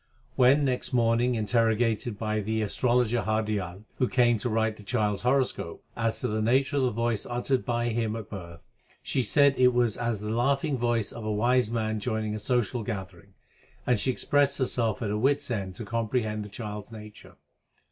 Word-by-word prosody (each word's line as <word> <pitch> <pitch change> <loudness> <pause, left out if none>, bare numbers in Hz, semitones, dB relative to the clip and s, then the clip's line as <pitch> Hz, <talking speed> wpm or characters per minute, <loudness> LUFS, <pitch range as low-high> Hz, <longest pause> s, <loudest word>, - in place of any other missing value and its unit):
When 135 +3 +5
next 130 -1 -2
morning 120 +1 +2
interrogated 115 0 +1
by 110 0 -1
the 110 +1 -1
astrologer 120 +2 +1
Hardial, 105 -3 -2 0.2
who 125 - +3
came 120 -3 +3
to 120 - -2
write 110 -1 0
the - - -12
child 105 -1 0
s - - -7
horoscope, 125 -9 0
as 115 -1 -1
to - - 0
the 110 +1 -1
nature 130 +6 +2
of - - +2
the 130 - +2
voice 115 -1 -1
uttered 125 +2 -1
by 120 0 -1
him 115 -1 -1
at 110 -4 -6
birth, 85 -4 -9 0.4
she 130 - 0
said 140 +4 +4
it 125 -1 +5
was 120 -3 +2
as 120 -3 -1
the 105 0 -3
laughing 135 +5 +1
voice 120 -3 0
of 115 - -8
a 110 - -2
wise 120 +2 +2
man 110 -2 -1
joining 110 -1 -2
a 110 - -3
social 120 +1 0
gathering; 95 -3 -7 0.5
and 125 -4 +2
she 130 - +1
expressed 140 +2 +2
herself 125 -2 0
at 105 - -1
her 105 - -1
wits 140 +2 +1
end 95 -5 -3
to 110 - -7
comprehend 110 -1 -1
the 105 - -9
child 105 -1 -6
s - - -12
nature. 105 -1 -12
115 Hz, 195 wpm, -27 LUFS, 105-125 Hz, 0.5 s, When